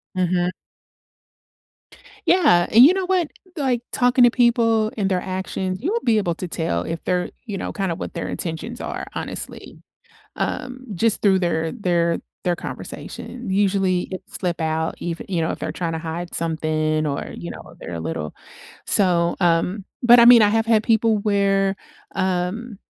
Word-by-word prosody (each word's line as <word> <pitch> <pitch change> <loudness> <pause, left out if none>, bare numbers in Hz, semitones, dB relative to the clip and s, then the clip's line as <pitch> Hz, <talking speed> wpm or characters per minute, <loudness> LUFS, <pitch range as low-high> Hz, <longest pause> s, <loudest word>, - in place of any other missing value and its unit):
Mhm. 180 -1 +1 1.8
Yeah, 295 - +5
and 235 +3 +8
you 330 +7 +7
know 380 -1 -1
what? 360 -4 +1 0.3
Like, 260 -5 0
talking 245 0 +4
to 245 - +7
people 230 -3 +3
and 195 -3 0
their 185 -1 +1
actions, 185 0 -3
you 355 +9 0
will 470 - 0
be 230 - +2
able 175 -5 0
to 180 - -5
tell 160 - -1
if 165 - -5
they're 180 -1 0 0.2
you 205 -4 -4
know, - - -4
kinda 195 -4 -2
what - - -6
their - - -4
intentions 185 +9 -5
are, - - -5
honestly, - - -6 0.6
um, 255 0 -3
just 220 +4 +1
through 195 -2 +4
their 165 -2 0
their 170 -6 0 0.3
their 175 -1 +2
conversation. 240 +5 -7
Usually, 190 -2 +1
it'd 185 - -5 0.2
slip 175 -2 -2
out, 160 0 -1
ev 170 -1 -4
you 180 -4 -1
know, 160 - 0
if - - -6
they're - - -3
trying 170 -2 -2
to 160 - -3
hide 170 +2 -5
something 155 -1 0
or, 140 -1 -3
you 85 +1 -6
know, - - -11
they're - - -7
a - - -4
little 80 -2 -4 0.5
so, 175 -3 +2
um 180 +3 +1 0.2
but, 240 0 +8
I 235 - +8
mean, 240 -1 +9
I 210 - +5
have 225 +1 +1
had 225 -2 +4
people 220 -1 +2
where, 195 -1 +2 0.4
um, 190 +4 -2
190 Hz, 175 wpm, -22 LUFS, 170-225 Hz, 1.8 s, mean